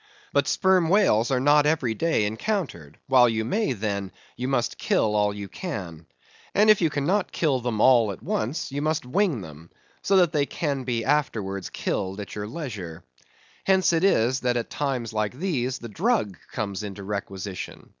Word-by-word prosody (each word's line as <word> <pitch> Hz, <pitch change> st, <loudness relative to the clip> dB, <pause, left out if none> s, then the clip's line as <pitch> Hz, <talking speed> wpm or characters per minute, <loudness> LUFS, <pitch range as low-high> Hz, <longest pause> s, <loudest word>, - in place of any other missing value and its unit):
But -, -, +2 dB
sperm 185 Hz, -3 st, +3 dB
whales 180 Hz, -, +4 dB
are 130 Hz, -2 st, +2 dB
not 145 Hz, +2 st, +4 dB
every 145 Hz, -7 st, +1 dB
day 135 Hz, -2 st, +1 dB
encountered; 110 Hz, -, -3 dB
while 125 Hz, -2 st, +5 dB
you 110 Hz, -1 st, -1 dB
may, 205 Hz, -, 0 dB
then, 100 Hz, -3 st, -3 dB, 0.2 s
you 125 Hz, -, -3 dB
must 125 Hz, -3 st, -1 dB
kill 105 Hz, -1 st, +1 dB
all 105 Hz, 0 st, +2 dB
you 100 Hz, -1 st, -6 dB
can. 90 Hz, -, -6 dB, 0.5 s
And 215 Hz, +1 st, +6 dB
if 210 Hz, -, +3 dB
you 165 Hz, -, +3 dB
cannot 170 Hz, +8 st, 0 dB
kill 145 Hz, -6 st, +1 dB
them 120 Hz, -3 st, -2 dB
all 115 Hz, -3 st, +5 dB
at 95 Hz, -, -10 dB
once, 125 Hz, +7 st, -2 dB
you 140 Hz, +1 st, -3 dB
must 155 Hz, 0 st, 0 dB
wing 155 Hz, -, +1 dB
them, 80 Hz, -1 st, -11 dB, 0.3 s
so 195 Hz, -, +3 dB
that 175 Hz, -4 st, +4 dB
they 145 Hz, -3 st, +1 dB
can 140 Hz, -5 st, -2 dB
be 115 Hz, -3 st, -1 dB
afterwards 110 Hz, -10 st, -1 dB
killed 95 Hz, 0 st, -3 dB
at 100 Hz, -, -7 dB
your 105 Hz, 0 st, -4 dB
leisure. 105 Hz, -, -6 dB, 0.6 s
Hence 190 Hz, -2 st, +3 dB
it 165 Hz, +1 st, +1 dB
is, 130 Hz, -9 st, +3 dB
that 125 Hz, -1 st, 0 dB
at 120 Hz, -, -4 dB
times 130 Hz, -6 st, -2 dB
like 105 Hz, 0 st, -1 dB
these 130 Hz, -6 st, -1 dB
the 120 Hz, -, -8 dB
drugg, 165 Hz, -, 0 dB, 0.2 s
comes 100 Hz, -2 st, -3 dB
into 100 Hz, -1 st, -7 dB
requisition. 100 Hz, -2 st, -6 dB
125 Hz, 180 wpm, -25 LUFS, 105-155 Hz, 0.6 s, And